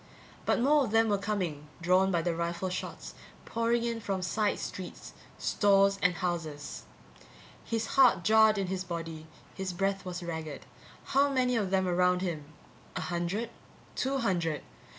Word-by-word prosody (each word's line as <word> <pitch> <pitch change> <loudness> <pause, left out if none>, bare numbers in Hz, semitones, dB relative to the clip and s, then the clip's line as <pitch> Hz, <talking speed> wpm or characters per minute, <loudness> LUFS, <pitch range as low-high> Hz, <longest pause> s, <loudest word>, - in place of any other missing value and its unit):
But - - +3
more 285 +4 +4
of - - -4
them 225 +1 +3
were 205 -1 +2
coming, 185 -8 -2
drawn 185 +3 +3
by 170 -3 +1
the 175 0 0
rifle 170 +2 -2
shots, 185 - -5 0.3
pouring 230 +1 +1
in 230 -1 -2
from 195 -3 -2
side 210 +3 +1
streets, 185 -2 -7 0.2
stores 195 -1 +3
and 180 -1 +3
houses. 160 -4 -4 0.8
His 225 -1 -1
heart 250 -10 +4
jarred 220 +1 +5
in 195 - 0
his 185 0 -3
body, 165 -3 -6 0.3
his 190 -1 -4
breath 195 +1 -1
was 180 -1 -5
ragged. 160 -3 -5 0.4
How 280 +1 +3
many 255 -2 +2
of 205 -4 0
them 190 -1 +2
around 180 +1 +2
him? 160 -5 -3 0.5
A - - -2
hundred? 180 +6 -2 0.4
Two 270 +1 0
hundred? 175 - 0
190 Hz, 155 wpm, -30 LUFS, 175-220 Hz, 0.8 s, jarred